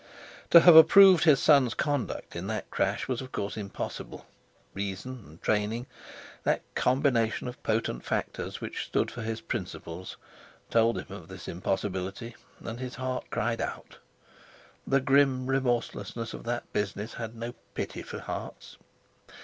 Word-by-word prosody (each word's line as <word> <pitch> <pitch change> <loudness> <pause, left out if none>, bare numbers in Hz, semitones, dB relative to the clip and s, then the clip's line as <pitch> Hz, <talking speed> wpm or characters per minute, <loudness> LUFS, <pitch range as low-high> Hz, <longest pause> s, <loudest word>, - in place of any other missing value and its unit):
To 170 - +9
have 175 -1 +8
approved 180 +3 +9
his 150 -5 +6
son's 140 -6 +4
conduct 145 -4 -2
in - - -4
that - - -4
crash - - 0
was, 130 -2 -2
of 130 -1 -9
course, 100 0 -3
impossible; 100 -2 -6 0.5
reason 100 +5 -5
and 80 +3 -15
training—that 110 +4 -2
combination 125 -4 +1
of 125 - -8
potent 110 +1 -1
factors - - -3
which - - -4
stood - - 0
for 120 - -7
his 115 0 -3
principles—told 110 +3 -3
him 95 - -7
of 90 -5 -11
this 95 -1 -10
impossibility, 95 +5 -3 0.3
and 115 +1 -6
his 125 -1 -5
heart 130 0 -3
cried 115 +1 -1
out. - - -6 0.9
The 135 0 +3
grim 135 -1 +3
remorselessness 120 -3 -1
of - - -8
that 120 +1 -4
business 105 +2 -2
had 115 0 -6
no 115 +1 -5 0.2
pity - - -4
for - - -7
hearts. - - -7
115 Hz, 140 wpm, -28 LUFS, 105-130 Hz, 0.9 s, To